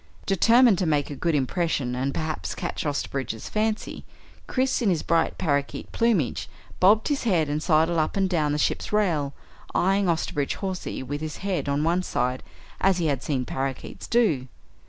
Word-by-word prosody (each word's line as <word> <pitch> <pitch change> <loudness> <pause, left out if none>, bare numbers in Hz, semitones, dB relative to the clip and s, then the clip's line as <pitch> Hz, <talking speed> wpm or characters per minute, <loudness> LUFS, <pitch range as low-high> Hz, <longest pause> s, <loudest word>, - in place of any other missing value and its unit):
Determined 230 +2 +5
to 185 - +1
make 150 -2 +1
a - - -4
good 165 +3 0
impression 140 -2 0
and 130 +2 -1
perhaps 155 +1 -3
catch - - -3
Osterbridge's 135 -5 -3
fancy, 215 0 -2 0.4
Chris, 260 0 0
in 220 - +2
his 170 -4 +1
bright 165 -1 +1
parakeet 140 -4 -1
plumage, 225 - +1 0.3
bobbed 210 +7 +5
his 290 -2 0
head 175 -8 +2
and 150 +1 -1
sidled 160 +1 +3
up 155 +5 0
and 195 -1 +2
down 155 -5 +1
the 150 - 0
ship's - - -1
rail, 170 -10 +1 0.4
eyeing 195 +1 +2
Osterbridge 145 -4 -1
Hawsey 190 -7 -4
with 145 +3 -4
his 155 -1 -5
head 185 -7 -1
on 140 +1 +1
one 170 +3 +2
side 125 -7 -1 0.4
as 195 -1 +3
he 170 - 0
had 140 -4 0
seen 130 -4 -1
parakeets 135 +1 -4
do. 170 - +2
160 Hz, 175 wpm, -25 LUFS, 145-195 Hz, 0.4 s, Determined